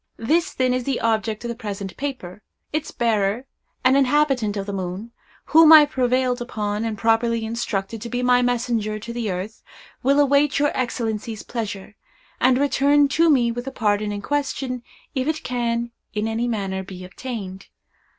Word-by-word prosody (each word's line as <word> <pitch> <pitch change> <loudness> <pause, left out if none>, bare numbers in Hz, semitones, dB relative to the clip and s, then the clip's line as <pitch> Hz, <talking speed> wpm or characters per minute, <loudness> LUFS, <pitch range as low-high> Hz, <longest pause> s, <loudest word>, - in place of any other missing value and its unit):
This, 320 +9 +1
then, 255 -1 +2
is 255 0 -1
the 270 -2 -1
object 220 0 -1
of - - -3
the - - -2
present 200 -5 -6
paper. 255 -10 -6 0.3
Its 310 0 -2
bearer, 225 0 0 0.4
an 260 +1 +6
inhabitant 270 -6 +2
of 195 - -3
the 200 - -5
moon, 190 +4 -5 0.3
whom 320 0 +7
I 315 -1 +11
have 295 0 +1
prevailed 255 -1 +1
upon, 210 -2 -3
and 220 -2 -3
properly 225 +1 +1
instructed, 220 -2 -3
to 235 - -6
be 245 +1 -2
my 250 0 +4
messenger 235 -3 0
to 230 +2 -7
the 235 -3 -2
earth, 190 +4 -5 0.4
will 280 +3 +3
await 285 0 +3
your 290 0 +2
Excellencies' 225 -3 -3
pleasure, 215 -3 -5 0.4
and 255 0 +4
return 285 +1 +3
to 330 +3 +3
me 245 -5 +3
with 245 +1 -5
the 270 - -4
pardon 210 -3 0
in 205 -1 -5
question, 270 -2 -2 0.3
if 260 +1 -1
it 310 0 -1
can, 235 -1 -1 0.2
in 210 +1 0
any 225 +2 -1
manner, 195 -4 -2
be 185 -1 -9
obtained. 195 -2 -7
235 Hz, 175 wpm, -22 LUFS, 210-260 Hz, 0.4 s, I